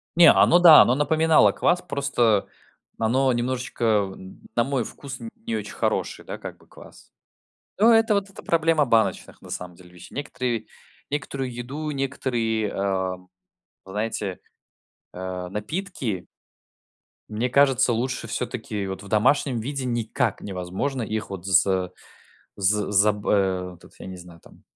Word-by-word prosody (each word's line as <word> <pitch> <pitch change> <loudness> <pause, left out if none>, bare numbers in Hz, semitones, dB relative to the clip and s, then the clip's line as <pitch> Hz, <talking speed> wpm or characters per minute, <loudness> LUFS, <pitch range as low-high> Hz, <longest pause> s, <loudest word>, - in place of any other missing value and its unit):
Не, 170 0 +8
оно 175 - +5
да, 165 -4 +10
оно 125 - +4
напоминало 160 +2 +4
квас, 175 0 +1
просто 140 - +1 0.5
оно 130 +4 +2
немножечко, 125 0 -3 0.3
м, 95 0 -13
на 120 - +3
мой 135 -1 -1
вкус 135 +3 -9
н 115 - -6 0.2
не 115 - -1
очень 105 -1 -5
хороший, - - -2
да, - - -6
как - - -8
бы - - -24
квас. - - -16 0.7
Ну, 225 +4 +6
это 225 -1 +4
вот 200 -1 -1
эта 195 - -12
проблема 165 -2 +2
баночных, 110 -5 0
на - - -12
самом 90 -1 -6
деле, 90 -1 -17
вещей. 90 - -14
Некоторые 125 -5 -3 0.4
некоторую 135 -3 -3
еду, 135 +6 -5
некоторые, 120 -6 -1
а, 95 -1 -1 0.7
знаете, 105 -1 -3 0.7
а, 90 0 -6
напитки 110 - -4 1.0
мне 110 +4 -1
кажется, 135 -2 +4
лучше 125 +1 -2
всё-таки 110 -4 -4
вот 95 0 -6
в 100 - -11
домашнем 120 +4 +2
виде 135 +2 -4
никак 120 -1 -1
невозможно 95 +8 -3
их 110 0 -4
вот 95 -2 -7
за 95 0 +2 0.7
з 100 +1 +1
за 105 +1 +4
б 105 0 -7
э, 95 -2 +1
этот - - -27
тут - - -28
я - - -9
не 95 0 -7
знаю 85 -1 -14
там - - -19
115 Hz, 150 wpm, -24 LUFS, 100-140 Hz, 1.0 s, да